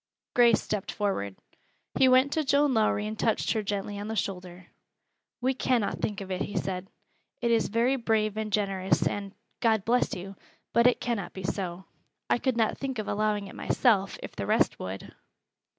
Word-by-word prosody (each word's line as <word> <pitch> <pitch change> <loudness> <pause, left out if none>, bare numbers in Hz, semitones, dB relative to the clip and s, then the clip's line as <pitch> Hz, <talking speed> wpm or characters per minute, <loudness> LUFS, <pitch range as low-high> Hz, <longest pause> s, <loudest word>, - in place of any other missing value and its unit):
Grace 240 -3 +5
stepped 210 -3 -3
forward. 190 - -2 0.6
He 260 - +7
went 260 +2 +5
to 315 - +1
Joan 285 0 +3
Lowrie 215 -2 +2
and 215 0 -5
touched 225 - +1
her 220 - 0
gently 205 0 -3
on 205 - -5
the 220 - -3
shoulder. 180 -3 -4 0.8
"We 260 +2 +2
cannot 245 -4 0
think 205 -1 -2
of 190 -1 -7
it," 185 +1 -2
he 205 - -3
said. 185 +1 -3 0.5
"It 235 -1 +1
is 230 -1 +3
very 235 +5 +2
brave 220 -3 +1
and 215 -1 -3
generous, 195 -2 +1
and 200 0 -4 0.2
God 220 -4 +2
bless 245 +2 +2
you! 195 +2 -7 0.4
but 235 +2 +5
it 250 - +2
cannot 215 -7 -2
be. 190 -1 -6 0.9
I - - +4
could 260 -2 0
not 225 -2 +1
think 265 -2 -3
of 215 - -3
allowing 210 -1 0
it 195 - -10
myself, 200 -6 +2
if - - -8
the - - -4
rest - - +2
would." 95 +1 -6
215 Hz, 180 wpm, -28 LUFS, 195-235 Hz, 0.9 s, He